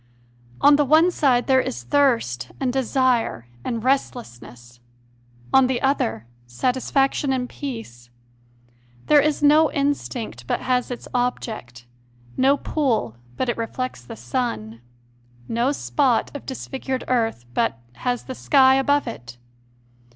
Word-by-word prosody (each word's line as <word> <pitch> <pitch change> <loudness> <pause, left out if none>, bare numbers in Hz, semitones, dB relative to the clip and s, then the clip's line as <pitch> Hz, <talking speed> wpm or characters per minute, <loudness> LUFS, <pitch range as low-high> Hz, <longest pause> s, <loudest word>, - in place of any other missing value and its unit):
On 285 0 +7
the 295 - +3
one 315 +5 +4
side 255 -7 +2
there 260 -1 +4
is 120 - -5
thirst 230 - +1
and 255 -2 -1
desire 255 - +1 0.2
and 230 -3 -3
restless 245 - -1
ness; 120 0 -15 0.7
on 265 -1 +6
the 255 -2 -1
other, 115 - 0 0.2
satisfaction 260 - 0
and 255 -1 -1
peace; 225 - -8 1.0
there 295 -1 +6
is 300 0 0
no 300 +1 +5
instinct 250 - -3
but - - -1
has 250 -1 0
its 245 - -7
object, 220 - -3 0.5
no 275 +2 +3
pool 240 - -1 0.2
but 260 - -1
it 240 - -1
reflects 230 - -4
the 120 - -9
sun, 115 - -4 0.7
no 235 - +1
spot 275 -3 0
of 285 - -8
disfigured 265 0 -4
earth 225 - 0
but - - 0 0.2
has 245 - -2
the 260 - -6
sky 265 0 +4
above 285 +1 +2
it. 120 - -8
250 Hz, 130 wpm, -22 LUFS, -, 1.0 s, On